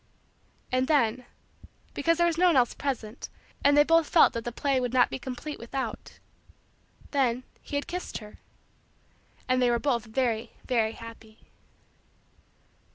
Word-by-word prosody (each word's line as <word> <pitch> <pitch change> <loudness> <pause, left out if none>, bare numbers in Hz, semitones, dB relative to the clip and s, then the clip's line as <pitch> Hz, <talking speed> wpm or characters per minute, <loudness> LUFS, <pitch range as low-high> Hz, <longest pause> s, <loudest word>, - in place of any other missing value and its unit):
And 255 +1 +1
then 250 -5 +2 0.7
because 330 +3 +1
there 345 - +3
was 340 -1 +1
no 365 - +5
one 340 - +4
else 245 -2 +3
present 250 -5 -4 0.3
and 285 +1 +5
they 295 - +8
both 330 0 +3
felt 335 - +6
that 230 -1 -4
the 240 - -3
play 270 +2 0
would 245 -1 -2
not 250 -1 +4
be - - -4
complete 260 +4 -6
without 235 0 -5 0.9
then, 255 -3 +1 0.2
he - - -7
had 285 - -1
kissed 360 +1 -5
her, 210 -1 -12 1.1
and 255 0 +2
they 245 - +4
were 240 - +2
both 240 -2 0
very, 230 0 -1
very, 225 -3 +1
happy. 225 -1 -13
255 Hz, 155 wpm, -27 LUFS, 230-285 Hz, 1.1 s, they